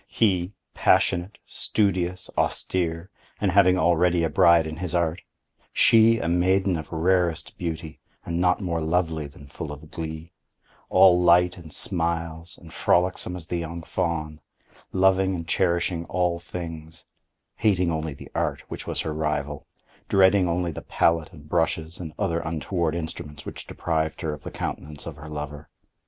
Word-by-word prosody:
He, 95 Hz, -3 st, +1 dB, 0.2 s
passionate, 90 Hz, +4 st, +2 dB
studious, 90 Hz, -3 st, 0 dB
austere, 85 Hz, 0 st, -1 dB, 0.3 s
and 100 Hz, -2 st, +1 dB
having 95 Hz, -1 st, +5 dB
already 85 Hz, 0 st, +3 dB
a 80 Hz, -, 0 dB
bride 85 Hz, 0 st, +5 dB
in 80 Hz, 0 st, -5 dB
his 90 Hz, 0 st, -3 dB
Art; 85 Hz, -1 st, 0 dB, 0.5 s
she 115 Hz, 0 st, +6 dB
a 85 Hz, -, -2 dB
maiden 90 Hz, +2 st, +2 dB
of 80 Hz, -2 st, -6 dB
rarest 85 Hz, 0 st, +1 dB
beauty, 80 Hz, -2 st, -5 dB, 0.3 s
and 85 Hz, 0 st, -2 dB
not 90 Hz, 0 st, +3 dB
more 85 Hz, -3 st, -1 dB
lovely 80 Hz, -2 st, 0 dB
than 70 Hz, 0 st, -14 dB
full 75 Hz, +2 st, -7 dB
of 75 Hz, +1 st, -11 dB
glee; 80 Hz, +1 st, -6 dB, 0.6 s
all 90 Hz, -2 st, +6 dB
light 90 Hz, 0 st, +5 dB
and 80 Hz, -3 st, -12 dB
smiles, 85 Hz, -4 st, -3 dB
and 80 Hz, -1 st, -14 dB
frolicsome 90 Hz, 0 st, +1 dB
as 85 Hz, -3 st, -7 dB
the 85 Hz, -, -3 dB
young 85 Hz, 0 st, -5 dB
fawn; 75 Hz, -3 st, -3 dB, 0.5 s
loving 95 Hz, 0 st, +3 dB
and 85 Hz, -2 st, -6 dB
cherishing 85 Hz, 0 st, +1 dB
all 90 Hz, -1 st, 0 dB
things; 80 Hz, -2 st, -8 dB, 0.5 s
hating 90 Hz, -5 st, +2 dB
only 80 Hz, -2 st, -3 dB
the -, -, -12 dB
Art -, -, -1 dB
which -, -, -7 dB
was -, -, -1 dB
her 80 Hz, -, -3 dB
rival; 75 Hz, -2 st, -2 dB, 0.4 s
dreading 95 Hz, -1 st, +4 dB
only 85 Hz, 0 st, 0 dB
the -, -, -7 dB
pallet 85 Hz, -1 st, +1 dB
and 75 Hz, -2 st, -14 dB
brushes 80 Hz, 0 st, -1 dB
and 80 Hz, -4 st, -6 dB
other 85 Hz, -5 st, 0 dB
untoward 85 Hz, 0 st, -2 dB
instruments 75 Hz, -3 st, -6 dB
which -, -, -8 dB
deprived 80 Hz, -1 st, -2 dB
her 80 Hz, -3 st, -2 dB
of 75 Hz, -, -9 dB
the -, -, -7 dB
countenance 75 Hz, 0 st, -6 dB
of 80 Hz, -3 st, -7 dB
her 75 Hz, +1 st, -10 dB
lover. 75 Hz, 0 st, -6 dB
85 Hz, 155 wpm, -25 LUFS, 80-90 Hz, 0.6 s, she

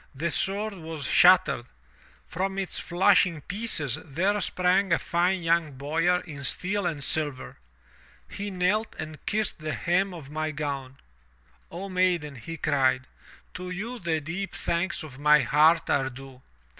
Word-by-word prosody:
The 165 Hz, +5 st, -2 dB
sword 205 Hz, +5 st, -1 dB
was 160 Hz, -4 st, -7 dB
shattered. 175 Hz, -7 st, +5 dB, 0.6 s
From 190 Hz, +3 st, -3 dB
its 195 Hz, -2 st, -2 dB
flashing 175 Hz, -2 st, +3 dB
pieces 180 Hz, -, -1 dB
there 190 Hz, +8 st, 0 dB
sprang 185 Hz, +1 st, +1 dB
a 165 Hz, -, +5 dB
fine 180 Hz, +1 st, 0 dB
young 165 Hz, -3 st, +1 dB
boyar 165 Hz, +6 st, +1 dB
in 145 Hz, -5 st, -9 dB
steel 190 Hz, +8 st, 0 dB
and 150 Hz, -5 st, -3 dB
silver. 145 Hz, -3 st, -2 dB, 0.7 s
He 205 Hz, +1 st, -5 dB
knelt 195 Hz, +4 st, 0 dB
and 155 Hz, -1 st, -7 dB
kissed 215 Hz, -3 st, -1 dB
the 155 Hz, 0 st, -3 dB
hem 185 Hz, +3 st, +1 dB
of 155 Hz, -6 st, -10 dB
my 155 Hz, +1 st, -2 dB
gown. 140 Hz, -3 st, -4 dB, 0.4 s
" 60 Hz, +1 st, -35 dB
'O 185 Hz, +4 st, -6 dB
maiden,' 180 Hz, -5 st, +1 dB
he 165 Hz, +8 st, -7 dB
cried, 130 Hz, -3 st, +1 dB, 0.5 s
*to 180 Hz, 0 st, -6 dB
you 220 Hz, +7 st, -5 dB
the 165 Hz, -3 st, 0 dB
deep 180 Hz, +6 st, -5 dB
thanks 170 Hz, +1 st, -1 dB
of 140 Hz, -4 st, -11 dB
my 150 Hz, 0 st, +6 dB
heart 155 Hz, +6 st, +4 dB
are 135 Hz, -2 st, +1 dB
due. 130 Hz, 0 st, -12 dB
165 Hz, 150 wpm, -27 LUFS, 145-185 Hz, 0.7 s, my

